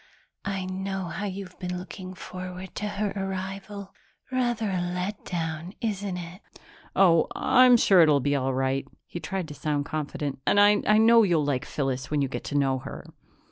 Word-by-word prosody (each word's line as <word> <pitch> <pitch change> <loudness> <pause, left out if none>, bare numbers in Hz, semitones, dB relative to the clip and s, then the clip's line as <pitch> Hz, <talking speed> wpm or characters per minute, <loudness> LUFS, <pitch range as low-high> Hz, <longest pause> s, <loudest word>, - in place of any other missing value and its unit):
"I 195 -1 -2
know 190 0 -3
how 195 +5 -3
you've 190 -1 -7
been 180 -1 -3
looking 185 0 -8
forward 185 0 -8
to 210 - -3
her 205 0 -2
arrival. 195 +1 -5 0.4
Rather 240 -5 0
a 185 - 0
letdown, 175 -2 -3
isn't 205 -4 -2
it?" 175 +2 -8 0.5
"Oh, 170 -4 +5
I'm 255 -1 +6
sure 195 -5 +6
it'll 150 -3 +5
be 145 +2 +1
all 135 -1 0
right." 135 +1 0 0.2
He 175 - -7
tried 175 +2 -3
to - - -6
sound 145 -1 -1
confident. 145 -2 -4
"And 205 - +4
I 205 0 +7 0.2
know 230 +1 +7
you'll 170 -8 +2
like 135 -3 -1
Phyllis 135 -2 -2
when 150 - 0
you - - 0
get 130 - -5
to 145 - -1
know 135 -2 +2
her." - - -8
185 Hz, 175 wpm, -26 LUFS, 155-195 Hz, 0.5 s, I